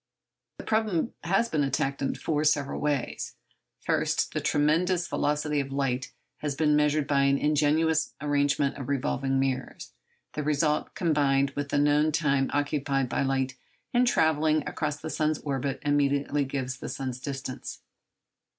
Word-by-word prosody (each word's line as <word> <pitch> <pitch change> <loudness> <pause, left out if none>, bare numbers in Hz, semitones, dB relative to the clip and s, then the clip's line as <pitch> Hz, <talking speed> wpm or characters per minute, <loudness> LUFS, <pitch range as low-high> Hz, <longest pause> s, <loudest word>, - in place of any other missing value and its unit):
The - - -8
problem 215 -3 0
has 195 +7 +2
been 155 -8 0
attacked 135 0 -1
in 135 - -1
four 150 -2 -1
several 145 -2 +1
ways. 145 -4 -2 0.5
First, - - 0
the - - -1
tremendous 170 +4 +2
velocity 150 0 0
of 135 -1 -3
light 135 -1 -1 0.3
has 145 -2 -3
been 150 0 +3
measured 150 0 +2
by 140 -1 +2
an 140 0 +3
ingenious 150 +2 +2
arrangement 145 -1 +1
of 140 -1 -6
revolving 135 0 0
mirrors; 135 -1 -3 0.4
the 150 - -2
result 150 +1 0
combined 140 -5 +2
with 145 0 -4
the - - 0
known 145 +2 +3
time 140 -3 +1
occupied 140 -2 0
by - - 0
light 135 -1 0 0.4
in 245 +1 +4
travelling 155 - +2
across 150 -1 -2
the 155 -1 -5
earth's 155 0 +2
orbit 140 -1 -2
immediately 145 0 +1
gives 130 -1 -3
the - - -6
sun's 130 -2 -4
distance. 135 -1 -6
145 Hz, 150 wpm, -27 LUFS, 135-155 Hz, 0.5 s, in